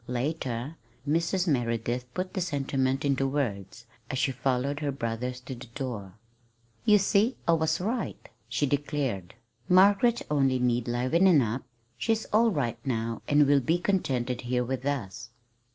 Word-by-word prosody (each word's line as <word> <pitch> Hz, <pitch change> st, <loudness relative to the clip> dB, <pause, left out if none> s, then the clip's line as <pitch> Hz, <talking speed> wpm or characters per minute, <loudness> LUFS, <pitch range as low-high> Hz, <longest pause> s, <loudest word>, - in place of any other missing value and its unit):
Later, 130 Hz, +1 st, -3 dB, 0.3 s
Mrs. 170 Hz, +4 st, +1 dB
Merideth 120 Hz, -3 st, 0 dB
put 185 Hz, 0 st, -3 dB
the 190 Hz, -, -2 dB
sentiment 135 Hz, -4 st, 0 dB
into 135 Hz, -1 st, +1 dB
words, 120 Hz, -5 st, -3 dB, 0.2 s
as 130 Hz, -, -2 dB
she 135 Hz, -, +1 dB
followed 135 Hz, +2 st, -1 dB
her 145 Hz, -2 st, -1 dB
brothers 125 Hz, 0 st, -3 dB
to 130 Hz, -, -7 dB
the 125 Hz, +1 st, -10 dB
door. 115 Hz, -9 st, -5 dB, 0.7 s
"You 210 Hz, -1 st, +6 dB
see, 205 Hz, +5 st, +2 dB
I 170 Hz, -, +5 dB
was 160 Hz, -1 st, +1 dB
right," 225 Hz, +6 st, -3 dB, 0.2 s
she 120 Hz, +5 st, +1 dB
declared. 135 Hz, -, -2 dB, 0.3 s
"Margaret 200 Hz, +6 st, +5 dB
only 135 Hz, -3 st, +3 dB
needed 120 Hz, -1 st, 0 dB
livening 150 Hz, +6 st, +4 dB
up. 115 Hz, +4 st, -2 dB, 0.4 s
She's 220 Hz, -, 0 dB
all 230 Hz, +2 st, +5 dB
right 140 Hz, -, -1 dB
now, 115 Hz, -3 st, -2 dB
and 145 Hz, 0 st, +5 dB
will 140 Hz, 0 st, +4 dB
be 160 Hz, +8 st, +2 dB
contented 130 Hz, -10 st, -1 dB
here 125 Hz, 0 st, 0 dB
with 130 Hz, +2 st, -3 dB
us." 120 Hz, -7 st, -3 dB
135 Hz, 150 wpm, -28 LUFS, 120-165 Hz, 0.7 s, You